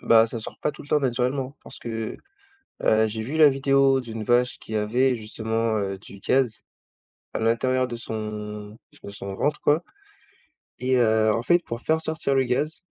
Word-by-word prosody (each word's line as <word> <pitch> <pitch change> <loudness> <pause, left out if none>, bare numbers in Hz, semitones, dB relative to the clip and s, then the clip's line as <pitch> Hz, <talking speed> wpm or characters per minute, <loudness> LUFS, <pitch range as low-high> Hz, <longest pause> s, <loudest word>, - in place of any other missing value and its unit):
bah, 115 0 +5
ça 115 - -4
sort 110 - -8
pas 150 - +1
tout - - -11
le 145 - -15
temps 150 - +3
naturellement. 130 +2 -1
Parce - - -11
que, 115 -1 -4 0.7
heu, 110 0 +4
j'ai 110 +1 -4
vu 140 +8 -4
la 155 -2 +8
vidéo 135 0 +3
d'une 115 -3 -6
vache 125 +2 +2
qui 110 - -8
avait 125 +5 +2
justement, 110 0 -2
heu, 95 -1 -2
du 100 0 -13
gaz, 125 +1 +1 0.7
à - - -1
l'intérieur 130 +3 +2
de 120 - -5
son 105 -1 -6 0.3
de 100 - -8
son 100 -1 -6
ventre, 150 +8 0
quoi, 150 +4 +3 1.0
et 130 0 +2
heu, 110 -2 +4
en 115 - -1
fait, 175 +3 +3
pour 115 +1 -6
faire 160 0 +1
sortir 160 -3 -1
le 135 - +4
gaz, 150 +8 -1
120 Hz, 185 wpm, -25 LUFS, 110-135 Hz, 1.0 s, la